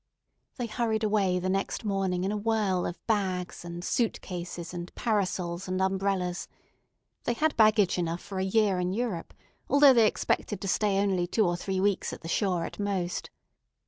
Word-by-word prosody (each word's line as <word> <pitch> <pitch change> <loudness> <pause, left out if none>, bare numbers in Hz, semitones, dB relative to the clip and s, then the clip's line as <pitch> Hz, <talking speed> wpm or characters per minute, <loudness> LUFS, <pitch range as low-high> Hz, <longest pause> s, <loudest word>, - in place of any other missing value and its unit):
They 245 - -3
hurried 225 -1 -1
away 200 -4 +2
the 180 +1 -2
next 195 +4 -1
morning 190 -3 0
in 195 - 0
a - - -1
whirl 210 -4 +1
of 175 - -5
bags 185 -6 -1
and 170 0 -7
suitcases 180 -6 -2
and 175 0 -6
parasols 185 -5 -1
and 185 0 -1
umbrellas. 190 -2 0 0.8
They 240 - +1
had 310 +5 +1
baggage 215 -4 +4
enough 170 0 -1
for 195 -2 -6
a - - +1
year 195 -1 +2
in 180 +1 -1
Europe, 215 -6 -3 0.4
although 280 -1 +7
they 230 -3 +6
expected 210 -1 -1
to 195 - -5
stay 200 0 +2
only 190 -3 +1
two 215 +4 +2
or 175 -1 +1
three 190 +1 -2
weeks 200 0 +1
at - - -8
the 165 - -7
shore 180 -1 0
at - - -8
most. 190 -3 -2
195 Hz, 175 wpm, -28 LUFS, 180-215 Hz, 0.8 s, although